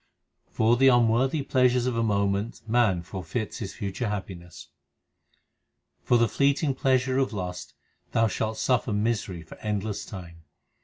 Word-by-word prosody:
For 115 +2 +2
the 135 +2 +5
unworthy 125 +4 +3
pleasures 125 -2 +2
of 125 -2 -1
a 115 - +1
moment 100 +1 -1
man 110 -7 +2
forfeits 95 +6 -5
his 100 -5 -6
future 105 +2 -3
happiness: 95 -4 -7 1.3
For 120 - +3
the 115 0 +3
fleeting 140 - +1
pleasure 130 0 +1
of 135 -4 0
lust, 90 -3 -6 0.4
thou 115 - +3
shalt 110 0 -2
suffer 115 0 +1
misery 105 -5 -1
for 80 - -13
endless 105 -1 -3
time. 85 -4 -10
110 Hz, 140 wpm, -26 LUFS, 100-125 Hz, 1.3 s, the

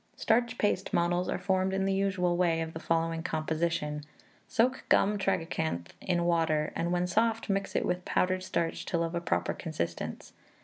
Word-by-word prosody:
Starch 235 +1 +1
paste 200 -2 0
models 175 +1 +1
are - - 0
formed 190 0 +1
in 195 0 +1
the 195 - +1
usual 190 -3 +1
way, 170 -2 +2
of 160 0 -4
the 160 - -5
following 165 0 0
composition: 155 -2 -1 0.4
Soak 250 +3 +1
gum 205 +1 +4
tragacanth 160 - -1
in 175 -2 0
water, 160 -3 +1
and 170 +1 -1
when 180 0 +1
soft, 225 +4 +1
mix 195 0 -1
it - - +1
with 180 0 -1
powdered 185 +1 +1
starch 170 -3 -2
till 170 -1 +1
of 165 0 -3
a 170 - -1
proper 170 - 0
consistence. 85 - -4
175 Hz, 175 wpm, -30 LUFS, 165-190 Hz, 0.4 s, gum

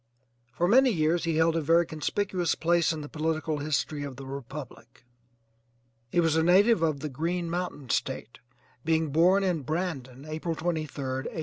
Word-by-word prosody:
For 170 +8 0
many 260 +6 +6
years 170 -3 +1
he 165 -1 0
held 160 +1 +3
a 165 - +1
very 165 +3 +4
conspicuous 175 +3 -1
place 170 0 +2
in 160 -1 -4
the 145 - -7
political 155 0 -2
history 150 0 -1
of 140 -2 -5
the 135 +1 -9
republic. 135 -1 -9 1.0
He 175 - +1
was 165 -2 +3
a 160 - +3
native 190 +4 +5
of 155 -4 0
the 155 - -3
'Green 170 +6 -2
Mountain 170 -8 -4
State,' 130 -3 -2 0.4
being 160 -1 +1
born 180 +6 +4
at 175 -6 0
Brandon, 140 -5 -4
April 160 +2 -3
23d, 160 - -9 0.6
1813. - - -5
160 Hz, 170 wpm, -28 LUFS, 145-175 Hz, 1.0 s, many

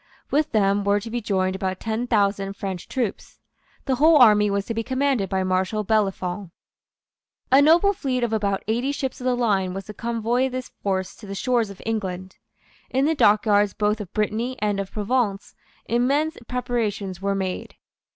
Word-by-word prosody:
With 300 +1 +1
them 200 -1 +2
were 200 +1 +2
to 225 +2 -8
be 240 0 -2
joined 190 -3 0
about 190 -1 -3
ten 225 +2 -2
thousand 200 -3 +1
French 190 -3 -5
troops. 245 -7 -4 0.5
The 260 -2 0
whole 310 +3 +6
army 210 -5 +6
was 200 0 -1
to 230 - -3
be 225 - -1
commanded 260 -4 0
by 190 -1 0
Marshal 185 +3 0
Bellefonds. 195 -3 -1 1.0
A 270 +2 +7
noble 340 +7 +5
fleet 255 -8 -2
of 230 -2 0
about 200 -3 0
eighty 240 +5 0
ships 265 -3 -4
of - - -6
the 255 -1 +2
line 195 -6 0
was 195 - -5
to 210 - -8
convoy 235 +3 0
this 255 0 -6
force 190 -2 -2
to 210 - -12
the 195 - -5
shores 235 0 +1
of 200 - -11
England. 190 -4 -4 0.5
In 265 +2 +1
the 320 - +2
dockyards 205 -5 +3
both 210 0 0
of 195 -2 -8
Brittany 225 +4 -1
and 205 -1 0
of 195 -1 -4
Provence 210 -2 -1 0.3
immense 280 +7 +1
preparations 215 -7 -2
were 200 0 0
made. 190 -1 -4
215 Hz, 180 wpm, -23 LUFS, 195-245 Hz, 1.0 s, A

